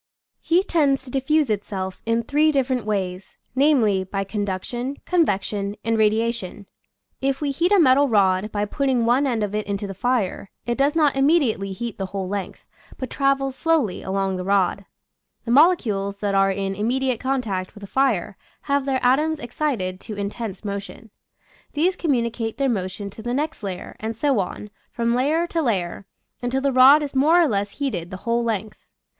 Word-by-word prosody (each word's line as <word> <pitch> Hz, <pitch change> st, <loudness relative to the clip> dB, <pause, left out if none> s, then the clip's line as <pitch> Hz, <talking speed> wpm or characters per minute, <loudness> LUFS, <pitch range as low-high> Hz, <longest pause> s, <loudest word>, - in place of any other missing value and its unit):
Heat 355 Hz, +3 st, +1 dB
tends 280 Hz, -5 st, +2 dB
to 255 Hz, -, -11 dB
diffuse 275 Hz, 0 st, +1 dB
itself 195 Hz, -2 st, -4 dB
in 230 Hz, 0 st, +1 dB
three 300 Hz, +5 st, +3 dB
different 260 Hz, -5 st, 0 dB
ways, 190 Hz, -2 st, -3 dB, 0.2 s
namely, 250 Hz, -9 st, +3 dB
by 195 Hz, +1 st, -3 dB
conduction, 210 Hz, +7 st, -3 dB
convection, 205 Hz, -, 0 dB
and 225 Hz, 0 st, +1 dB
radiation. 220 Hz, -2 st, 0 dB, 0.6 s
If 270 Hz, 0 st, 0 dB
we 290 Hz, -2 st, -1 dB
heat 340 Hz, +7 st, 0 dB
a 410 Hz, -, +6 dB
metal 280 Hz, -2 st, +5 dB
rod 195 Hz, -1 st, +2 dB
by 205 Hz, 0 st, -1 dB
putting 255 Hz, +1 st, 0 dB
one 255 Hz, +4 st, +3 dB
end 230 Hz, -4 st, 0 dB
of 205 Hz, -1 st, -3 dB
it 210 Hz, -1 st, -2 dB
into 200 Hz, 0 st, -2 dB
the 195 Hz, -, -5 dB
fire, 210 Hz, -2 st, -1 dB, 0.2 s
it 240 Hz, -, -1 dB
does 280 Hz, +3 st, +1 dB
not 300 Hz, -4 st, +3 dB
immediately 270 Hz, -, +2 dB
heat 230 Hz, +2 st, -5 dB
the 195 Hz, -, -2 dB
whole 190 Hz, -1 st, -4 dB
length, 200 Hz, 0 st, -5 dB, 0.3 s
but 260 Hz, -, -5 dB
travels 275 Hz, -1 st, +1 dB
slowly 315 Hz, -, +1 dB
along 195 Hz, 0 st, -1 dB
the 180 Hz, -, -4 dB
rod 195 Hz, 0 st, +1 dB, 0.6 s
The 230 Hz, -, -2 dB
molecules 230 Hz, -, +3 dB
that 200 Hz, 0 st, -2 dB
are 195 Hz, 0 st, +4 dB
in 195 Hz, 0 st, -2 dB
immediate 245 Hz, +4 st, 0 dB
contact 225 Hz, -9 st, -2 dB
with 205 Hz, -, -12 dB
the -, -, -7 dB
fire 230 Hz, -7 st, 0 dB, 0.2 s
have 280 Hz, -1 st, 0 dB
their 260 Hz, -2 st, 0 dB
atoms 300 Hz, +5 st, +2 dB
excited 240 Hz, -8 st, -2 dB
to 210 Hz, 0 st, -8 dB
intense 205 Hz, 0 st, -5 dB
motion; 200 Hz, +2 st, -6 dB, 0.6 s
these 345 Hz, +5 st, +1 dB
communicate 235 Hz, -6 st, -1 dB
their 275 Hz, -1 st, +1 dB
motion 200 Hz, -2 st, -3 dB
to 220 Hz, -, -11 dB
the 240 Hz, +2 st, -2 dB
next 305 Hz, 0 st, -2 dB
layer, 190 Hz, -3 st, -6 dB
and 220 Hz, 0 st, -4 dB
so 275 Hz, -2 st, +2 dB
on, 200 Hz, +2 st, -4 dB, 0.2 s
from 235 Hz, 0 st, 0 dB
layer 295 Hz, +7 st, +1 dB
to 335 Hz, -1 st, -1 dB
layer, 195 Hz, -, -2 dB, 0.3 s
until 245 Hz, +2 st, 0 dB
the 275 Hz, -1 st, +1 dB
rod 270 Hz, +4 st, +7 dB
is 285 Hz, -, -5 dB
more 305 Hz, +6 st, +4 dB
or 340 Hz, -, +5 dB
less 205 Hz, -4 st, -1 dB
heated 250 Hz, -, -3 dB
the 185 Hz, -, -6 dB
whole 235 Hz, 0 st, +1 dB
length. 220 Hz, -2 st, -3 dB
235 Hz, 180 wpm, -23 LUFS, 200-275 Hz, 0.6 s, rod